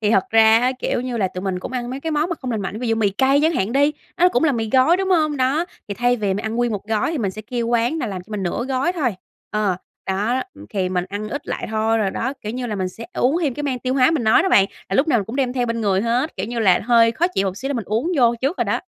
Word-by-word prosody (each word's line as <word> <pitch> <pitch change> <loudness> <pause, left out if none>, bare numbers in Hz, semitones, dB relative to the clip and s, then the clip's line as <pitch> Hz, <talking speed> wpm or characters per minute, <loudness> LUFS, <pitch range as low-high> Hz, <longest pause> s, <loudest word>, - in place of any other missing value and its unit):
Thì 210 -1 +1
thật 195 -4 +3
ra 225 0 +6
á, 255 +1 +2
kiểu 250 - -1
như 250 -1 -3
là, 195 -4 +1
tụi 185 0 -7
mình 190 -2 -2
cũng 220 - -7
ăn 245 -1 -3
mấy 265 +2 -5
cái 320 +2 -3
món 305 +2 0
mà - - 0
không 255 - -4
lành 220 -3 -1
mạnh, 200 +2 -4
ví 245 0 -3
dụ 225 - +2
mì 220 -2 +2
cay 270 +7 +3
chẳng 320 +2 +3
hạn 215 - -1
đi, 285 +2 +3 0.2
nó 360 - +5
cũng 245 -4 +1
là 305 - +3
mì 225 -3 -2
gói, 265 +8 +5
đúng 385 0 -2
hông? 310 -5 +2
Đó, 265 +6 +1 0.2
thì 200 - -3
thay 245 +3 +2
vì 210 -3 -2
mình 195 +2 -1
ăn 220 +1 -2
nguyên 240 -1 +1
1 205 0 -5
gói, 220 +6 0
thì 315 - -2
mình 205 -6 -1
sẽ 215 +3 -9
kêu 235 +1 -3
quán 240 +6 +1
là - - -2
làm 190 -3 -5
cho 205 - -22
mình 210 -2 -3
nửa 185 +6 -2
gói 270 +6 0
thôi, 275 - -1 0.4
ờ, 210 -4 0 0.3
đó, 200 +5 0
đó, 260 - 0
ừm, 100 +1 -12
thì 190 -2 -1
mình 180 -1 -1
ăn 205 +2 -5
ít 285 +5 -5
lại - - -3
thôi. 220 +1 +1
Rồi 200 -3 +1
đó, 255 +3 -2
kiểu 215 - -5
như 250 0 -3
là, 215 - -3
mình 185 -2 -2
sẽ 225 +5 -10
uống 270 +6 +2
thêm 280 -6 0
cái 295 - -5
men 265 -3 -1
tiêu 255 +1 -2
hóa 260 +2 +4
mình 295 -8 0
nói 220 - +5
đó 380 - +1
bạn, 195 - +5 0.2
là 195 - -2
lúc 285 +4 +2
nào 250 -6 +4
mình 200 - -2
cũng 230 +6 -6
đem 260 -3 0
theo 250 -1 -1
bên 230 0 -2
người 195 -3 +1
hết, 245 +7 0
kiểu - - -3
như 235 +1 -4
là, 190 -6 +4
hơi 230 -1 +5
khó 335 +8 +1
chịu 200 - -1
một 190 -1 -3
xíu 265 +6 -4
là 285 - -1
mình 230 - -3
uống 230 - -1
vô 240 -3 +4
trước 275 +7 0
rồi - - +2
đó. - - -1
235 Hz, 335 wpm, -21 LUFS, 210-270 Hz, 0.4 s, ra